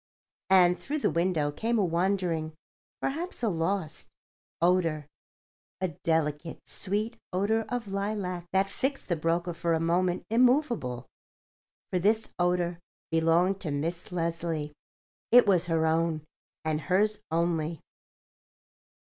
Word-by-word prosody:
And 180 -2 +5
through 295 +2 -3
the 295 - +1
window 165 -4 +1
came 230 +9 0
a 205 - +3
wandering—perhaps 180 - -2
a 225 - +3
lost—odour—a 170 -1 -3
delicate, 160 -1 -1
sweet 210 +4 -2
odour 215 +4 +1
of 245 -4 -3
lilac 195 -3 -3
that 190 +1 +3
fixed 265 +6 -3
the 175 - +2
broker 170 +2 0
for 170 0 0
a - - 0
moment 175 +2 +1
immovable. 235 - +2 0.9
For 180 - +1
this 220 +4 +1
odour 175 -1 +1 0.3
belonged 165 +4 +3
to 165 - -3
Miss 165 +6 -3
Leslie; 165 -3 -2 0.6
it 245 +1 +8
was 185 -4 +3
her 165 -1 +2
own, 160 -1 +1 0.4
and 155 -1 0
hers 205 +7 +1
only. 165 -1 0
175 Hz, 115 wpm, -28 LUFS, 165-200 Hz, 0.9 s, it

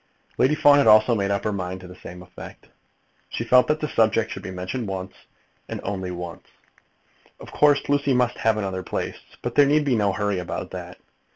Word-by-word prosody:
Lady 140 +4 +3
Fawn 145 -1 +6
had 140 - +3
also 110 +2 +6
made 100 -3 0
up 100 0 -1
her 105 - -1
mind 95 -1 -4
to 90 - -11
the 90 - -11
same 90 0 -11
effect. 85 - -13 0.6
She - - -4
felt 125 0 +4
that 150 0 +1
the 150 - -1
subject 115 -3 +1
should - - -6
be - - -7
mentioned 95 +6 -5
once, 95 0 -5 0.6
and - - -5
once - - -8
only. 90 -3 -5 1.0
Of - - -12
course 145 -1 +3
Lucy 140 -2 +1
must 125 -1 +1
have 110 -1 +2
another 95 -3 -3
place, - - -4 0.3
but 120 - -3
there 145 +1 +5
need 150 +1 +2
be 135 -4 +2
no 105 -3 +2
hurry 105 -1 -1
about 90 - -5
that. - - -8
105 Hz, 205 wpm, -23 LUFS, 95-130 Hz, 1.0 s, Fawn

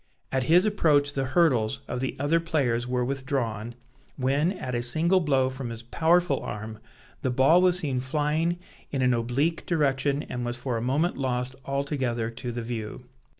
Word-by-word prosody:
At 130 -1 0
his 175 +7 +5
approach 150 -9 +3
the 135 -1 -1
hurdles 130 -7 +2
of - - -3
the 130 0 -2
other 145 +4 +2
players 130 -8 0
were 125 -1 0
withdrawn, 125 -4 -3 0.4
when, 140 +6 +1
at 130 -9 -5
a 120 - 0
single 160 +10 +3
blow 135 -6 +2
from 130 -2 -6
his 115 0 -7
powerful 170 +7 +2
arm, 110 +1 -6 0.4
the 130 - 0
ball 135 +8 +5
was 180 -1 +4
seen 140 -7 -1
flying 150 +6 0 0.3
in 135 -2 -1
an 125 0 +3
oblique 125 +8 0
direction 145 -3 +1
and 125 0 -5
was 120 0 0
for 125 0 -3
a 115 - -2
moment 145 +9 0
lost 125 -1 -1
altogether 135 -5 -1
to 120 +1 -5
the 120 0 -4
view. 115 +1 -6
130 Hz, 175 wpm, -26 LUFS, 120-155 Hz, 0.4 s, his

